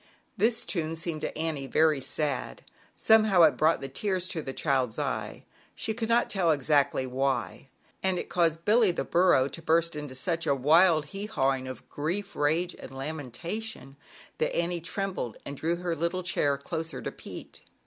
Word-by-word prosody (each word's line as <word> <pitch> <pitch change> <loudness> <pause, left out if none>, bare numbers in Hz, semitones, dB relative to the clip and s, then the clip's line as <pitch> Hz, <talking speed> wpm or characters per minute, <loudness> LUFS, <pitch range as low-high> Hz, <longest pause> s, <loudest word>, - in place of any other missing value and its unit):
This 225 +3 +2
tune 165 -3 -1
seemed 165 -2 -3
to - - -4
Annie 155 -4 -3
very 155 -1 +3
sad. 140 -2 -2 0.3
Some 220 0 +5
how 190 -5 +5
it 155 - +6
brought 160 0 +2
the 135 - -3
tears 185 +6 -1
to 165 - -3
the 135 - -5
child's 130 -5 0
eye - - -3 0.3
she 220 - -2
could 225 0 -3
not 235 +1 +3
tell 185 -4 +1
exactly 145 -2 +2
why, 135 +1 -2 0.3
and 190 -1 +1
it - - -4
caused 165 -2 +1
Billy, 220 -1 +5
the 175 - -1
burro, 175 -7 +4
to 165 - -7
burst 165 0 +1
out - - -3
into 145 -3 -7
such 165 +5 0
a 140 - +3
wild 155 +3 +5
" - - -16
he 200 +2 -4
hawing" 135 -8 0
of 130 - -8
grief, 195 +7 -3
rage 160 +5 +1
and - - -9
lamentation, 155 - -5 0.4
that 155 - 0
Annie 170 0 -1
trembled 180 - -3
and 140 - -6
drew 165 +4 0
her 175 -1 -3
little 170 +3 -1
chair 145 -5 +1
closer 160 +3 -4
to - - -3
Pete. - - -10
165 Hz, 185 wpm, -28 LUFS, 140-180 Hz, 0.4 s, it